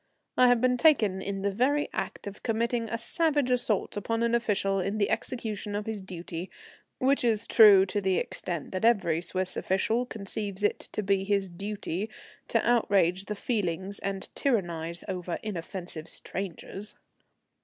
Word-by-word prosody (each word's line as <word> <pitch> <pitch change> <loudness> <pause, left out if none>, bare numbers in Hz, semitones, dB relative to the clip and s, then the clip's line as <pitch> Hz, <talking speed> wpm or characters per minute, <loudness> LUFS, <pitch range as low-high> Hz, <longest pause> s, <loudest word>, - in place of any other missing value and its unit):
I 250 - +6
had 245 -2 +4
been 250 0 +3
taken 220 - +4
in 195 0 -4
the 200 - +1
very 270 +8 +2
act - - -4
of 200 0 -7
committing 230 0 0
a 230 - -1
savage 290 +2 +1
assault 240 -5 +1
upon 230 +3 -1
an 235 0 +1
official 200 -4 +1
in 195 +3 -1
the 200 -2 +1
execution 215 -4 -3
of 205 0 -2
his 220 -2 -4
duty, 175 -1 -6 0.5
which 275 +2 +2
is 225 -3 +2
true 205 -4 +8
to 205 +2 -2
the 190 -1 +1
extent 170 -5 -3
that 185 +1 -3
every 195 -8 +3
Swiss 185 +1 -2
official 225 +6 0
conceives 205 -2 -3
it 205 - +2
to 215 - -1
be 195 -1 +2
his 195 -2 0
duty 200 +1 -4 0.4
to - - +1
outrage 195 -6 +3
the 210 - -4
feelings 200 -3 -2
and 195 -1 -3
tyrannize 170 - -1
over 180 -3 -3
inoffensive 175 -4 -5
strangers. 195 +2 -6
200 Hz, 160 wpm, -28 LUFS, 190-230 Hz, 0.5 s, true